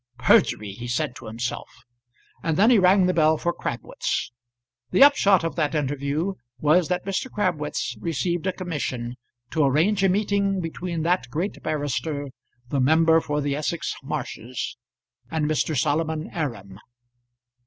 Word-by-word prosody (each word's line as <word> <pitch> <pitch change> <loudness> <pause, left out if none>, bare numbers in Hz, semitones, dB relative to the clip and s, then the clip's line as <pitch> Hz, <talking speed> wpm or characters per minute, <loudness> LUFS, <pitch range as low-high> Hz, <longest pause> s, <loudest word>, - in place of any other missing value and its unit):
"Perjury!" 110 -4 +3
he 120 +5 -7
said 125 +2 -1
to - - -10
himself, 115 +3 -4 0.7
and 160 -2 -1
then 220 +5 +5
he 235 - +6
rang 185 +1 +5
the 180 - +2
bell 155 -1 +4
for 175 +2 -1
Crabwitz. 120 -3 -3 0.6
The 270 - +6
upshot 200 - +5
of 165 - -2
that 155 -1 0
interview 145 +5 -1 0.2
was 155 +5 +3
that 180 0 -2
Mr. 195 +7 -2
Crabwitz 155 - -2
received 170 - -1
a - - +2
commission 145 -10 -4 0.4
to 155 - +2
arrange 165 +9 +2
a 195 - +5
meeting 200 0 +1
between 170 -1 -4
that 175 -6 +1
great 170 +10 -3
barrister, 145 -1 -2 0.4
the 140 - 0
member 160 +4 +4
for 150 -1 -2
the 140 -1 -1
Essex 155 +3 -2
Marshes, 130 -4 -5 0.5
and 160 0 -1
Mr. 155 0 0
Solomon 155 +2 -1
Aram. 105 - -4
155 Hz, 145 wpm, -24 LUFS, 140-180 Hz, 0.7 s, he